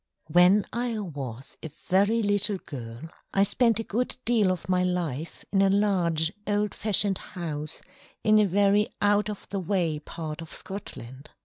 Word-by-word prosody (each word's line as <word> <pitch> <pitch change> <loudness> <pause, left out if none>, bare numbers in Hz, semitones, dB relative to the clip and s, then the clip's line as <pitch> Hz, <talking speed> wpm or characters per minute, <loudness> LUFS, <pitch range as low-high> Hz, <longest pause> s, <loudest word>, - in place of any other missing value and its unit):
When 180 +4 +6
I 235 -1 -1
was 135 - -6
a 160 - -6 0.2
very 205 +5 +3
little 205 0 +1
girl, 120 -7 -8 0.3
I 195 - +5
spent 230 +2 +3
a - - -1
good 240 +4 -1
deal 220 -5 +3
of 180 -3 -4
my 180 -1 +2
life 170 -4 -3
in 195 - +3
a 195 - +4
large 180 -5 +2
old 205 0 0
fashioned 205 -2 +1
house 155 -3 -5 0.4
in 215 0 +5
a 210 - +4
very 200 +2 +3
out 205 0 +3
of 210 - -7
the 200 - -2
way 175 -4 0
part 155 0 -6
of 165 0 -9
Scotland. 150 - -7
190 Hz, 165 wpm, -27 LUFS, 160-205 Hz, 0.4 s, When